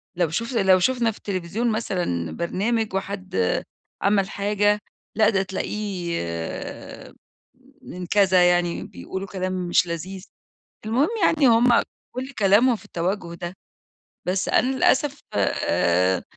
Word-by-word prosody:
لو 175 -3 +1
شُف 230 +9 -3
لو 190 -4 +4
شُفنا 240 +2 +2
في 215 - -14
التليفزيون 200 +5 -2
مثلًا 175 - -2
برنامج 210 +5 -1
وحد 195 -1 -4 0.7
عمل 195 -1 +2
حاجة، 205 +1 +1 0.4
لأ، 215 0 +5
ده 195 -3 +1
تلاقيه 190 - -3 1.6
من 180 0 -8
كذا، 185 -2 +4
يعني 175 -1 +1
بيقولوا 190 - -7
كلام 185 -1 -3 0.2
مش 175 - +3
لذيذ، 180 +3 -5 0.6
المهم 250 +7 +2 0.2
يعني 295 -5 +4
هُم 235 +1 +5 0.3
كل 260 +2 -4
كلامهم 215 +5 +5
في 205 - -13
التَوجُّه 175 -1 -3
ده. 175 +1 -6 0.7
بس 185 +1 0
أنا 260 +1 +2
للأسف 280 +2 +2
آآ، 90 -2 +1
195 Hz, 120 wpm, -23 LUFS, 175-220 Hz, 1.6 s, لأ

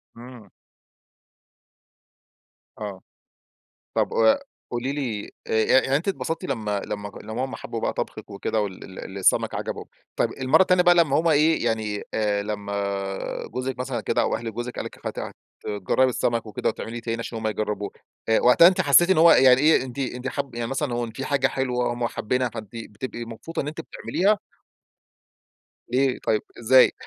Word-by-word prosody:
امم. 120 -4 -12 2.3
آه. 100 -3 -6 0.9
طب - - +1
وأ 110 - +4 0.3
قولي 125 +3 -2
لي 120 -8 -3 0.2
أ - - -5
يع 110 +4 +4
يعني 135 - +1
أنتِ 160 +7 -1
اتبسطتِ 165 -2 -2
لمّا 105 -6 -2
لمّا 100 0 -5
لمّا 110 +5 -3
هُم 130 - -7
حبوا - - -6
بقى - - 0
طبخِك - - -5
وكده 105 +2 -1
وال 95 -2 -6
ال 95 - -8
السمك 95 - +2
عجبهُم. - - -4 0.3
طيب - - +1
المرة 130 +6 +3
التانية 185 -1 +4
بقى 175 0 +6
لمّا 155 -4 +4
هم 165 - +1
إيه 155 -3 +3
يعني 110 -2 -1
آآ، 105 -2 0
لمّا 100 -2 -3
جوزِك 130 0 -4
مثلًا 125 -3 -2
كده - - +1
أو - - +1
أهل 115 -1 -5
جوزِك 120 +2 -5
قال - - -4
لِك - - -7
هت - - -5 0.3
تجربي 105 +6 +1
السمك 115 -2 0
وكده 105 - -1
وتعمليه 115 +1 -5
تاني 115 0 -3
عشان 115 0 -5
هُم 110 - -2
يجربوه، 105 -1 -2 0.4
أ 110 - +4
وقتها 125 +7 +7
أنتِ 185 +1 +3
حسيتِ 175 +4 +6
إن 190 - +4
هو 165 +1 +8
يعني 130 0 +6
إيه 155 -2 +5
أنتِ 130 +1 -7
أنتِ 125 -1 -3
حاب 135 -1 -4
يعني 120 -1 -2
مثلًا 135 0 -2
هو 120 - -1
إن 115 - -8
في 130 +4 -5
حاجة 140 -2 +2
حلوة 125 -3 -1
هُم 120 0 -1
حابينها 125 +2 -1
فأنتِ 110 -2 -8
بتبقي 115 +2 -6
مبسوطة 120 +9 -5
إن - - -5
أنتِ 160 +2 -5
بتعمليها؟ 200 +5 0 1.5
ليه 130 +1 +1
طيب، 110 -1 +1 0.2
إزاي؟ 125 +3 +6
120 Hz, 175 wpm, -24 LUFS, 110-135 Hz, 2.3 s, هو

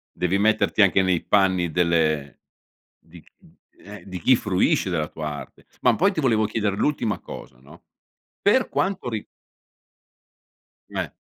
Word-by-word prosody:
Devi 90 +2 0
metterti 105 0 +2
anche 95 0 +4
nei 95 -3 +1
panni 95 -4 +2
delle 80 -4 0 0.6
di 80 -1 -17
c - - -27
uhm, - - -22 0.2
eh, 100 +1 -12
di 90 -2 -7
chi 130 +7 +4
fruisce 95 -2 +1
della 80 -3 -1
tua 75 -1 -6
arte. 70 - -10 0.2
Ma - - +4
poi 195 +4 +2
ti 160 - -2
volevo 110 -5 +2
chiedere 105 -2 -2
l'ultima 120 -6 -1
cosa, - - -11
no, 75 +6 -17 0.6
per 230 +5 +3
quanto 190 -9 -2
ri 110 -3 -4 1.7
M - - -10
Eh. - - -3
95 Hz, 155 wpm, -23 LUFS, 85-110 Hz, 1.7 s, anche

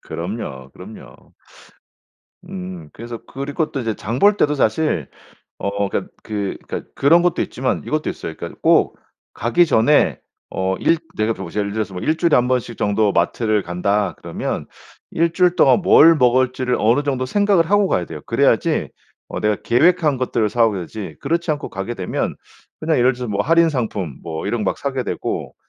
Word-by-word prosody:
그럼요 85 - -6
그럼요. - - -13 1.2
음 90 -4 -7
그래서 115 0 -8
그리고 145 +3 -3
또 140 - -3
이제 115 -1 -1
장 115 +7 -4
볼 205 +1 +5
때도 150 0 +2
사실 110 - 0 0.5
어 100 0 -2
그러니까 - - -3
그 100 -3 -3
그러니까 - - -6
그런 165 +5 +5
것도 175 -1 +1
있지만 130 +1 -2
이것도 155 0 -1
있어요. 80 - -6
그러니까 - - -8
꼭 - - +3 0.4
가기 170 +10 +2
전에 145 +1 +3 0.3
어 95 0 -1
일 165 - +3 0.2
내가 110 +1 0
보실 95 0 -5
예를 100 0 -3
들어서 110 -3 -3
뭐 90 - -5
1 155 - +1
주일에 170 -1 +3
1 125 0 +3
번씩 125 -2 -1
정도 105 0 +1
마트를 105 +4 +1
간다 100 +3 -1
그러면 - - -4 0.4
1 165 0 +1
주일 180 0 +3
동안 200 - +5
뭘 165 -1 +7
먹을지를 130 -1 +2
어느 115 +7 +3
정도 135 -3 -1
생각을 195 +1 +2
하고 205 -1 +4
가야 90 - 0
돼요. 80 -3 -8
그래야지 - - +1 0.4
어 - - -4
내가 105 -1 +1
계획한 155 +2 +3
것들을 115 -4 0
사 115 +1 +3
오게 105 -4 -1
되지. 90 -3 -7
그렇지 170 +4 -1
않고 145 -1 -4
가게 95 +5 -4
되면 90 -3 -3 0.4
그냥 155 0 +1
예를 125 +1 +4
들어서 125 0 -6
뭐 100 -1 0
할인 165 +2 +4
상품 105 - -3
뭐 80 +2 -5
이런 110 +1 -1
거 - - +1
막 - - -12
사게 135 -2 -2
되고 - - -4
120 Hz, 355 characters per minute, -20 LUFS, 100-150 Hz, 1.2 s, 뭘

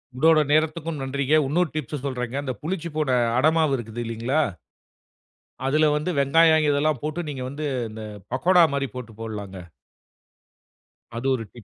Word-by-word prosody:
உங்களோட 155 +3 +5
நேரத்துக்கும் 155 0 0
நன்றிங்க. 140 +2 0
உன்னொரு 170 +3 +1
டிப்ஸ்சு 150 -2 -4
சொல்றேங்க. 125 -1 -3
அந்த 130 - -3
புளிச்சு 170 +1 -3
போன, 150 -4 0 0.3
அடமாவு 155 +1 +3
இருக்குதில்லைங்களா 115 +4 -2 1.2
அதுல 155 +3 +3
வந்து 150 +4 -3
வெங்காயம் 155 +2 +4
இதெல்லாம் 145 -1 +1
போட்டு, 155 +3 -3
நீங்க 130 -3 -5
வந்து 150 +2 -5 0.2
இந்த, 110 0 -8 0.3
பக்கோடா 175 +7 +4
மாரி 140 -1 -1
போட்டு 120 -3 -7
போடலாங்க. 100 -4 -6 1.6
அது 120 +3 -3
ஒரு 115 - -5
டிப்பு. 120 - -13
140 Hz, 135 wpm, -24 LUFS, 125-155 Hz, 1.6 s, உங்களோட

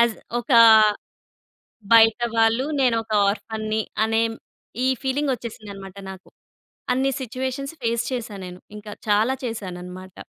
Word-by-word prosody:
As 235 -1 +3 0.2
ఒకా 235 0 +4 1.3
బయట 225 +1 +6 0.2
వాళ్ళు 225 +3 +3 0.2
నేనొక 230 -3 +1 0.2
ఆర్ఫన్‌ని 220 0 -3 0.2
అనే 225 0 +1
మ్ - - -15 0.5
ఈ - - +2 0.2
ఫీలింగొచ్చేసిందనమాట 235 -8 -4
నాకు. 190 0 -12 0.6
అన్ని 265 +2 +1
సిచ్యువేషన్స్ 260 +4 -4
ఫేస్ 230 0 0
చేశా 230 -4 -4
నేను. 180 0 -10 0.2
ఇంక 210 0 -11 0.2
చాలా 215 +5 +3
చేశాననమాట. 185 -4 -7
225 Hz, 110 wpm, -23 LUFS, 210-250 Hz, 1.3 s, బయట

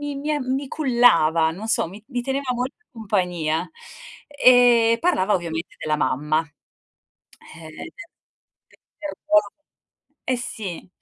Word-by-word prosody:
mi 290 +2 -3
a 295 - 0
mi 265 +1 -2
cullava, 170 - +3
non 200 +7 -7
so, 225 - +1
mi 200 +5 -12
mi 250 -3 -3
teneva 270 0 -2
molta 250 +3 -3
in - - -68
compagnia, 180 -7 -1 0.6
ehm, 245 -4 +5
parlava 215 - +1
ovviamente 165 -2 -5
della 155 -1 -1
mamma, 150 +2 0 1.2
ehm, 165 -1 -11
del 240 - -9 1.1
perdo 295 -9 +1 0.9
eh 255 - +2
sì, 205 -8 -6
225 Hz, 120 wpm, -22 LUFS, 165-260 Hz, 1.2 s, ehm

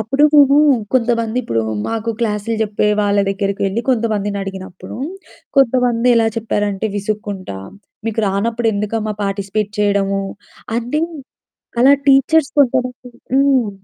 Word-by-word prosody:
అప్పుడు 240 +7 0
మేము 280 -1 +6 0.4
కొంతమంది 230 -2 +1
ఇప్పుడు 115 - -1 0.3
మాకు 225 0 -2
క్లాసులు 220 0 -1
చెప్పే 210 0 0
వాళ్ళ 205 0 +1
దగ్గరకి 195 0 -2
వెళ్లి 195 +4 -1
కొంతమందిని 215 -5 0
అడిగినప్పుడు, 190 -1 -8 0.6
కొంతమంది 250 -2 +3
ఎలా 230 -1 +3
చెప్పారంటే 210 -2 -1
విసుక్కుంటా 205 - -4 0.5
"మీకు 225 0 -1
రానప్పుడు 225 +4 0
ఎందుకమ్మా 210 +1 -2
పార్టిసిపేట్ 200 +1 -2
చేయడము," 200 -1 +1 0.6
అంటే 245 +6 -1 0.8
అలా 270 +3 +7
టీచర్స్ 275 +2 +4
కొంతమంది 250 -2 0 0.2
హ్మ్. 270 -5 +3
220 Hz, 115 wpm, -18 LUFS, 200-245 Hz, 0.8 s, అలా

